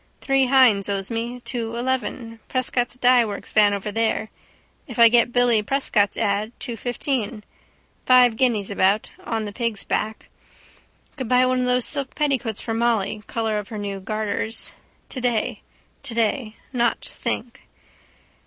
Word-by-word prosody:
Three 270 Hz, -1 st, +2 dB
Hynes 245 Hz, -7 st, +4 dB
owes 195 Hz, +1 st, -3 dB
me. 235 Hz, +2 st, -4 dB
Two 235 Hz, -2 st, -4 dB
eleven. 235 Hz, -2 st, -3 dB
Prescott's 250 Hz, -1 st, -1 dB
dyeworks 245 Hz, -5 st, +2 dB
van 210 Hz, -1 st, +5 dB
over 200 Hz, +1 st, -3 dB
there. 220 Hz, 0 st, -1 dB, 0.6 s
If 240 Hz, -, -8 dB
I 230 Hz, -1 st, +8 dB
get 240 Hz, 0 st, +4 dB
Billy 245 Hz, -3 st, +3 dB
Prescott's 210 Hz, -3 st, +1 dB
ad: 210 Hz, +1 st, 0 dB
two 240 Hz, -3 st, -5 dB
fifteen. 240 Hz, -2 st, -3 dB, 0.6 s
Five 250 Hz, -2 st, +6 dB
guineas 220 Hz, -5 st, +1 dB
about. 200 Hz, +2 st, +1 dB
On 225 Hz, -2 st, -2 dB
the 205 Hz, -, -6 dB
pig's 230 Hz, -3 st, -2 dB
back. 220 Hz, 0 st, -3 dB, 0.9 s
Could 260 Hz, -5 st, -4 dB
buy 250 Hz, 0 st, +4 dB
one 255 Hz, 0 st, +1 dB
of 250 Hz, -, 0 dB
those 250 Hz, -1 st, +2 dB
silk 280 Hz, -3 st, -1 dB
petticoats 265 Hz, -7 st, -1 dB
for 225 Hz, -, -3 dB
Molly, 225 Hz, -3 st, 0 dB
colour 220 Hz, -2 st, -1 dB
of 205 Hz, -, -7 dB
her 220 Hz, -, -6 dB
new 200 Hz, -1 st, -4 dB
garters. 215 Hz, +2 st, -1 dB, 0.3 s
Today. 245 Hz, -4 st, -1 dB, 0.4 s
Today. 230 Hz, -2 st, -1 dB, 0.2 s
Not 240 Hz, -2 st, 0 dB
think. 240 Hz, -, -5 dB
230 Hz, 145 wpm, -23 LUFS, 215-250 Hz, 0.9 s, I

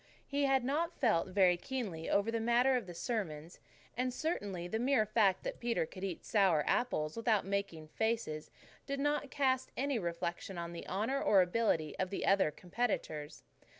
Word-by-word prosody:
He 285 Hz, 0 st, 0 dB
had 270 Hz, -2 st, +3 dB
not 330 Hz, +6 st, -1 dB
felt 220 Hz, -, +2 dB
very 185 Hz, -2 st, +4 dB
keenly 195 Hz, -8 st, -4 dB
over 205 Hz, +3 st, +2 dB
the 230 Hz, -, 0 dB
matter 240 Hz, +3 st, +3 dB
of 240 Hz, -6 st, -2 dB
the 175 Hz, -, -7 dB
sermons, 170 Hz, -7 st, -4 dB, 0.4 s
and 255 Hz, +1 st, 0 dB
certainly 205 Hz, -, -3 dB
the 220 Hz, +5 st, -2 dB
mere 250 Hz, -2 st, +3 dB
fact 205 Hz, -3 st, +2 dB
that -, -, -4 dB
Peter 235 Hz, -7 st, 0 dB
could 185 Hz, +4 st, -10 dB
eat 185 Hz, -4 st, -4 dB
sour 190 Hz, -8 st, +3 dB
apples 155 Hz, -11 st, 0 dB
without 225 Hz, -4 st, +1 dB
making 195 Hz, -5 st, -3 dB
faces 220 Hz, -8 st, -2 dB, 0.4 s
did 275 Hz, 0 st, -2 dB
not 290 Hz, 0 st, 0 dB
cast 260 Hz, -2 st, +1 dB
any 275 Hz, -2 st, 0 dB
reflection 170 Hz, +1 st, -4 dB
on 170 Hz, 0 st, -5 dB
the 170 Hz, -, -7 dB
honour 220 Hz, +9 st, -1 dB
or 195 Hz, -3 st, +5 dB
ability 175 Hz, -5 st, 0 dB
of 185 Hz, -, 0 dB
the 195 Hz, -, -3 dB
other 195 Hz, -5 st, +4 dB
competitors. 170 Hz, -4 st, -3 dB
205 Hz, 175 wpm, -34 LUFS, 175-250 Hz, 0.4 s, or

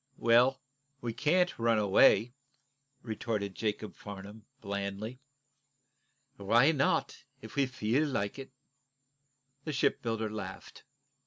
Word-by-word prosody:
"Well, 120 Hz, +3 st, +4 dB, 0.4 s
we 120 Hz, -4 st, -4 dB
can't 175 Hz, +6 st, +1 dB
run 115 Hz, -1 st, +3 dB
away," 105 Hz, +3 st, +4 dB, 0.7 s
retorted 110 Hz, -3 st, -3 dB
Jacob 105 Hz, +1 st, -3 dB
Farnum, 100 Hz, +1 st, -10 dB
blandly. 100 Hz, +4 st, -5 dB, 1.2 s
"Why 115 Hz, +9 st, +4 dB
not, 140 Hz, -3 st, 0 dB, 0.2 s
if -, -, -10 dB
we 140 Hz, -2 st, +2 dB
feel 130 Hz, +4 st, 0 dB
like 105 Hz, -3 st, -2 dB
it?" 135 Hz, -, -8 dB, 1.1 s
The 155 Hz, -, -4 dB
shipbuilder 115 Hz, -4 st, 0 dB
laughed. 100 Hz, -3 st, -8 dB
115 Hz, 100 wpm, -31 LUFS, 100-130 Hz, 1.2 s, Well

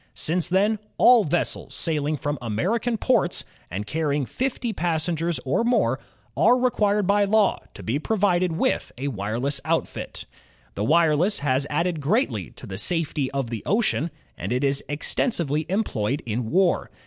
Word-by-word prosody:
Since 170 Hz, +2 st, 0 dB
then, 205 Hz, +4 st, +2 dB, 0.2 s
all 240 Hz, -3 st, +7 dB
vessels 165 Hz, +3 st, -1 dB
sailing 155 Hz, -2 st, -1 dB
from 145 Hz, 0 st, -3 dB
American 205 Hz, -, -1 dB
ports, 215 Hz, -7 st, +2 dB, 0.3 s
and 100 Hz, +4 st, -4 dB
carrying 150 Hz, +1 st, -1 dB
fifty 245 Hz, -, -2 dB
passengers 170 Hz, -1 st, -1 dB
or 135 Hz, -, +1 dB
more, 240 Hz, +1 st, +2 dB, 0.4 s
are 245 Hz, -, +5 dB
required 210 Hz, -5 st, +2 dB
by 200 Hz, +1 st, +3 dB
law 210 Hz, 0 st, +3 dB, 0.2 s
to -, -, -10 dB
be 120 Hz, +6 st, -1 dB
provided 185 Hz, -2 st, +1 dB
with 160 Hz, -, 0 dB
a 140 Hz, +3 st, -2 dB
wireless 120 Hz, +6 st, -2 dB
outfit. -, -, -3 dB, 0.5 s
The 100 Hz, -, -3 dB
wireless 165 Hz, -, +3 dB
has 140 Hz, 0 st, +1 dB
added 170 Hz, +1 st, 0 dB
greatly 140 Hz, -, 0 dB
to -, -, -12 dB
the 95 Hz, -3 st, -6 dB
safety 155 Hz, -3 st, +1 dB
of 135 Hz, -4 st, -3 dB
the 115 Hz, -3 st, -3 dB
ocean; 205 Hz, -6 st, +1 dB, 0.3 s
and 95 Hz, -, -5 dB
it 125 Hz, +3 st, 0 dB
is 140 Hz, 0 st, +1 dB
extensively 155 Hz, -, -1 dB
employed 140 Hz, -, -1 dB
in 115 Hz, 0 st, -2 dB
war. 185 Hz, +2 st, +2 dB
160 Hz, 150 wpm, -24 LUFS, 135-200 Hz, 0.5 s, all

